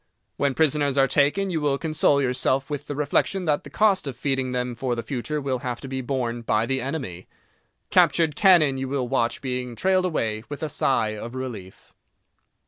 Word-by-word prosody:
When 140 -2 0
prisoners 145 -3 +1
are 135 0 +5
taken 150 +9 +2
you 160 -3 -1
will 145 -2 +1
console 150 -2 +2
yourself 130 +2 0
with 145 - -4
the 145 - -4
reflection 150 +6 0
that 150 -2 +1
the 140 - -10
cost 195 0 +2
of 130 -3 -5
feeding 135 -1 -1
them 125 0 -2
for 125 0 -2
the 115 - -4
future 145 +3 -3
will 135 -3 -2
have 120 -1 -4
to 135 - -7
be 130 0 -3
borne 120 -2 -2
by 110 -1 +1
the 130 +2 -1
enemy. 130 - -5 0.6
Captured 160 -3 +3
cannon 160 -9 +5
you 135 - -3
will 135 -2 -1
watch 120 -2 0
being 125 -2 -3
trailed 185 +5 +2
away 110 -11 -1
with 145 +2 -6
a 155 - -1
sigh 130 -5 +1
of 115 +4 -7
relief. 115 -8 -8
135 Hz, 195 wpm, -24 LUFS, 125-150 Hz, 0.6 s, are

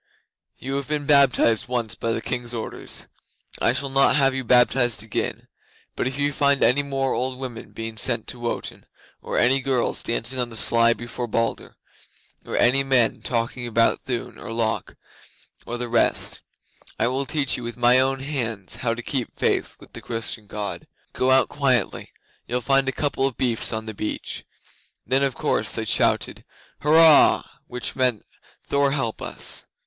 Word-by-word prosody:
You 135 +2 -4
have 140 - -4
been 150 -1 -2
baptized 135 -6 +3
once 120 -3 -1
by 115 - -2
the 115 - -3
King's 120 -1 -3
orders. 110 - -5 0.5
I - - +4
shall 135 +2 -2
not 135 0 +4
have 135 -2 +3
you 130 0 -3
baptized 120 -1 +3
again; 110 - -3 0.5
but - - -1
if 135 +2 -4
I 145 0 +2
find 140 0 +2
any 135 +4 +4
more 135 -2 -1
old 130 0 -2
women 125 -3 -7
being 115 0 -6
sent 115 0 0
to 125 - -6
Wotan, 120 0 -5 0.3
or - - -4
any 135 +3 +3
girls 130 -3 0
dancing 120 +2 -2
on 120 -1 0
the 115 - -10
sly 115 +1 +4
before 120 +1 -6
Balder, 115 +1 -2 0.7
or - - -3
any 135 +3 +4
men 125 -5 +2
talking 115 +2 -2
about 115 0 +2
Thun 125 -3 -4
or - - -8
Lok 115 -1 -2 0.7
or 120 - -3
the 120 0 -3
rest, 115 -1 +1 0.6
I - - +2
will 130 +2 -1
teach 140 -3 0
you - - -6
with 120 0 -6
my 125 +1 +5
own 135 0 +1
hands 115 -9 -3
how 115 -1 -1
to 120 - -7
keep 130 -2 -3
faith - - 0
with - - -16
the - - -9
Christian 115 -2 -4
God. 105 0 -5 0.3
Go 130 - 0
out 130 0 +5
quietly; 130 -7 0 0.4
you'll 125 +1 -1
find 135 +1 +2
a - - 0
couple 135 -1 0
of 135 - -6
beefs 120 -3 0
on 110 0 -3
the 110 - -6
beach." 105 +1 -5 0.6
Then 130 +4 +2
of 135 -3 +1
course - - 0
they - - -2
shouted - - +1 0.4
"Hurrah!" 160 +1 +6 0.2
which 125 0 -2
meant 125 -5 +1 0.4
"Thor 140 -1 +1
help 120 -6 -2
us!" - - -2
125 Hz, 175 wpm, -23 LUFS, 115-135 Hz, 0.7 s, Hurrah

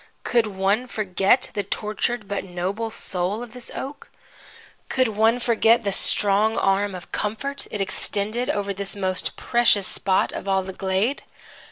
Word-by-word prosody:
Could 235 -3 +2
one 200 +5 0
forget 205 +2 +1
the 205 - 0
tortured 215 +3 -2
but 200 0 -2
noble 190 +5 -3
soul 200 0 -1
of 240 -2 -11
this 250 -1 -6
oak? 280 +2 -7 0.8
Could 255 -2 +2
one 220 +3 +3
forget 230 -1 +3
the 200 - 0
strong 205 +3 +2
arm 195 0 +1
of 180 - -10
comfort 275 +7 -3
it 210 - -4
extended 210 +4 -1
over 200 -1 -1
this 195 +1 -5
most 185 -2 -2
precious 235 -5 +3
spot 190 0 +1
of - - -6
all 190 -1 +2
the 190 0 -7
glade? 195 +8 0
205 Hz, 155 wpm, -23 LUFS, 195-230 Hz, 0.8 s, one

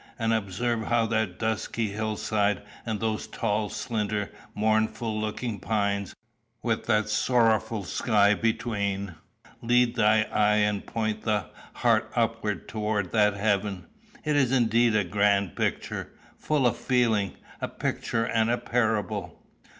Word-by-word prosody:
And 115 -1 +1
observe 110 +2 -1
how 120 -1 +2
that 110 -5 -1
dusky 110 0 -1
hill 110 +1 -3
side, 105 -3 0 0.2
and 110 -2 -1
those 110 0 -2
tall 105 -2 -1
slender 105 -3 -2 0.2
mournful 110 +1 0
looking 110 0 -3
pines, 100 -1 -1 0.5
with 115 -2 -1
that 110 -2 +2
sorrowful 110 -1 +2
sky 105 +2 +3
between, 100 -4 -1 0.5
lead 120 0 +3
the 115 - +1
eye 105 -1 +3
and 105 -1 +1
point 110 -1 -2
the 105 -2 -1 0.2
heart - - +2
upward - - -1
towards 105 -3 -2
that 105 -2 +3
heaven. 100 -3 0 0.4
It 150 -1 +1
is 135 -4 +3
indeed 120 -2 +3
a 105 - +3
grand 100 0 +1
picture, - - -2 0.2
full 150 -4 0
of 120 - +2
feeling 115 -6 +1 0.3
a - - -1
picture 115 -1 -2
and 115 -1 +1
a 120 - +2
parable." 110 -6 -1
110 Hz, 135 wpm, -27 LUFS, 105-115 Hz, 0.5 s, sky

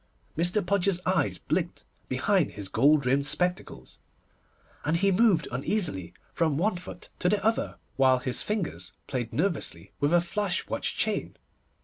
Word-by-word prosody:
Mr. 175 +5 +1
Podgers's 195 -1 +2
eyes 105 - +1
blinked - - -2 0.3
behind - - +1
his 100 -2 -5
gold 140 +5 +4
rimmed 140 +3 +2
spectacles, 180 +4 -2 0.8
and 155 +3 +1
he 195 +3 +3
moved 190 -4 +3
uneasily 125 - -1 0.2
from 160 -4 +1
one 200 +5 +1
foot 180 - -9
to 180 - +2
the 200 0 0
other, 225 +1 0 0.2
while 130 -1 +5
his 125 0 -2
fingers 110 - -3
played 120 -3 -3
nervously 160 +6 -2
with 145 +2 +1
a 175 - +5
flash 190 +1 -1
watch - - -2
chain. - - -1
170 Hz, 145 wpm, -27 LUFS, 130-190 Hz, 0.8 s, while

